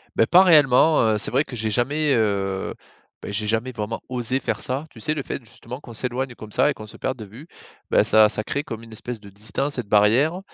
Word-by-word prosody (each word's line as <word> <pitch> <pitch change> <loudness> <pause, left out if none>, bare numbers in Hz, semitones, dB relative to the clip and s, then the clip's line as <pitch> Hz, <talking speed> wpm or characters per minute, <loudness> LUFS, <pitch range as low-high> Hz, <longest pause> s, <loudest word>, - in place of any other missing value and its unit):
Beh, 115 - +4
pas 180 +7 +6
réellement, 155 -2 +5
heu, - - 0
c'est - - 0
vrai 135 +4 +2
que 125 - -9
j'ai 110 0 -1
jamais, 140 +6 +1
heu, 100 -3 -1 0.5
bah, - - -6
j'ai 105 +1 -2
jamais 115 +3 -1
vraiment 110 0 -4
osé 125 +1 -1
faire - - -3
ça. 135 +4 -2
Tu - - -14
sais, 155 0 0
le 140 -3 -4
fait, 125 - -6
justement, 125 +4 -10
qu'on 120 - -11
s'éloigne 125 +2 -3
comme 105 -1 -10
ça - - +3
et - - -3
qu'on 110 -3 -10
se - - -14
perde 130 -1 -3
de 110 - -8
vue, 120 - -13 0.4
bah, - - +4
ça 110 -1 +5
ça 105 0 -2
crée 140 +1 -2
comme 115 -7 -7
une 115 -1 -13
espèce 120 +1 -6
de 100 - -14
distance 110 +8 -3
et 125 - -2
de 100 - -25
barrière. 120 - +3
120 Hz, 250 wpm, -23 LUFS, 110-135 Hz, 0.5 s, pas